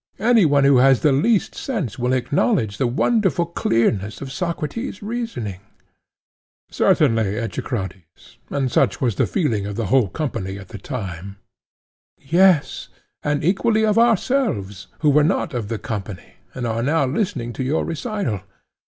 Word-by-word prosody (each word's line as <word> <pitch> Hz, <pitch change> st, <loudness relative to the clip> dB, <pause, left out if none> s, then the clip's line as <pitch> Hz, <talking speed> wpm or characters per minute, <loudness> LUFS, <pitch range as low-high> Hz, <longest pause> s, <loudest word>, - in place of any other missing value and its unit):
Any 225 Hz, -2 st, +4 dB
one 145 Hz, -2 st, +3 dB
who 140 Hz, -1 st, +5 dB
has 135 Hz, 0 st, +5 dB
the 150 Hz, -, +4 dB
least 200 Hz, -, +2 dB
sense 180 Hz, -, -4 dB
will 125 Hz, +1 st, 0 dB
acknowledge 130 Hz, -, 0 dB
the 130 Hz, -, +2 dB
wonderful 180 Hz, -, +1 dB
clearness 115 Hz, -, 0 dB
of 135 Hz, -1 st, -7 dB
Socrates' 180 Hz, -, -4 dB
reasoning. 210 Hz, -, -4 dB
PHAEDO: 110 Hz, -, -42 dB
Certainly, 110 Hz, -3 st, +2 dB
Echecrates; 95 Hz, -, -6 dB
and 135 Hz, -3 st, -1 dB
such -, -, +2 dB
was 120 Hz, -4 st, +1 dB
the -, -, +2 dB
feeling 115 Hz, -, -1 dB
of 105 Hz, -, -5 dB
the 115 Hz, -, -2 dB
whole 130 Hz, -6 st, +4 dB
company 100 Hz, -, -4 dB
at 95 Hz, -1 st, -11 dB
the -, -, -8 dB
time. 100 Hz, -, -6 dB, 0.8 s
ECHECRATES: 135 Hz, -, -25 dB
Yes, 180 Hz, -3 st, +3 dB, 0.3 s
and 145 Hz, 0 st, -1 dB
equally 215 Hz, +5 st, +2 dB
of 215 Hz, +1 st, +3 dB
ourselves, 220 Hz, -, +1 dB
who 150 Hz, -, +4 dB
were 150 Hz, +1 st, +4 dB
not 160 Hz, -1 st, 0 dB
of 120 Hz, -4 st, -3 dB
the 115 Hz, +1 st, -3 dB
company, 105 Hz, -4 st, -6 dB, 0.2 s
and 125 Hz, -, -3 dB
are 115 Hz, 0 st, -1 dB
now 145 Hz, +3 st, +2 dB
listening 130 Hz, -, -2 dB
to 130 Hz, -, -4 dB
your 145 Hz, +5 st, 0 dB
recital. 165 Hz, -, -3 dB
135 Hz, 155 wpm, -21 LUFS, 110-180 Hz, 0.8 s, who